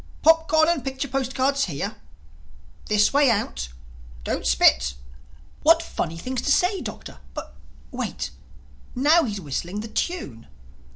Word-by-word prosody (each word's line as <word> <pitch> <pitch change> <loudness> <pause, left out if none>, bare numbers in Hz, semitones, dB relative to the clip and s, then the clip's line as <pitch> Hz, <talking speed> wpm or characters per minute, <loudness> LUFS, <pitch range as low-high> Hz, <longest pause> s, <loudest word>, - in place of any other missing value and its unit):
'Popcorn 320 -1 +5
and 335 -6 +1
picture 265 +1 -3
postcards 270 +1 0
here'.... 140 -6 -4 0.9
'This 210 +2 +3
way 285 -1 +5
out'.... 65 - -1 0.5
'Don't - - -2
spit'—What 65 - +1
funny 165 - -4
things 255 +7 -3
to - - 0
say, 365 +5 +2
Doctor!—Oh, - - -8 0.2
but - - -7 0.4
wait!—Now 300 +6 -1
he's 205 -4 -3
whistling 175 +5 -4
the 220 - -6
tune." 220 - -4
245 Hz, 115 wpm, -24 LUFS, -, 0.9 s, Popcorn